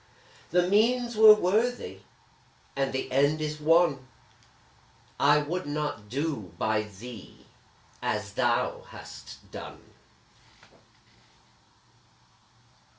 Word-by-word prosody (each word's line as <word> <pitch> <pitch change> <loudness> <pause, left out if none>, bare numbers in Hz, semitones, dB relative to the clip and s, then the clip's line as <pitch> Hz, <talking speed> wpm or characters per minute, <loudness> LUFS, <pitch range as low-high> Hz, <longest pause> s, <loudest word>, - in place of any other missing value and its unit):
The 180 +1 +2
means 235 +4 +2
were 215 0 +9
worthy, 215 +6 -1 0.8
and 135 -1 0
the 130 0 -4
end 145 +4 +2
is 150 0 -4
won 155 -4 +3 1.1
I 145 +1 +5
would 155 +4 -3
not 145 -8 -4
do 130 - -3
by 110 +2 +1
thee 105 +1 -11 0.6
as - - -3
thou - - 0
hast - - -12
done! - - -10
150 Hz, 90 wpm, -27 LUFS, 130-180 Hz, 1.1 s, were